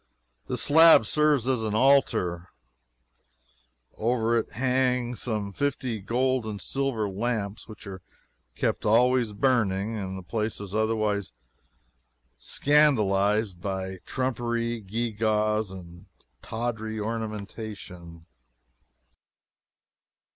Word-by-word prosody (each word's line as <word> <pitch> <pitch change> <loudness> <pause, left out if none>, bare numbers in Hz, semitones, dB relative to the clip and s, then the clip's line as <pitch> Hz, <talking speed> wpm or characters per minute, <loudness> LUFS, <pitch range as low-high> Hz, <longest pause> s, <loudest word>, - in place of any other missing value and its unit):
This - - -2
slab 160 -5 +7
serves 150 -2 +2
as 130 -3 +1
an 110 -1 -2
altar, 110 -9 +2 1.4
now. - - -33
Over 115 0 +1
it - - -6
hang 125 -1 +1
some 110 -4 -3
fifty 130 -3 -2
gold 125 +5 0
and 105 -2 -5
silver 135 -5 -1
lamps, 105 +1 -3
which 110 -2 -12
are 95 -2 -8 0.5
kept - - -1
always 120 +1 +3
burning, 110 -3 +1
and 95 -3 -4
the 95 - -8
place 110 +3 -3
is 100 -1 -8
otherwise 110 - 0 1.1
scandalized 105 - +2
by 95 -1 -4
trumpery, 120 -2 -2
gewgaws, 110 0 0
and 85 -2 -11 0.3
tawdry 110 -1 -4
ornamentation. 105 -6 -6
110 Hz, 95 wpm, -26 LUFS, 100-125 Hz, 1.4 s, slab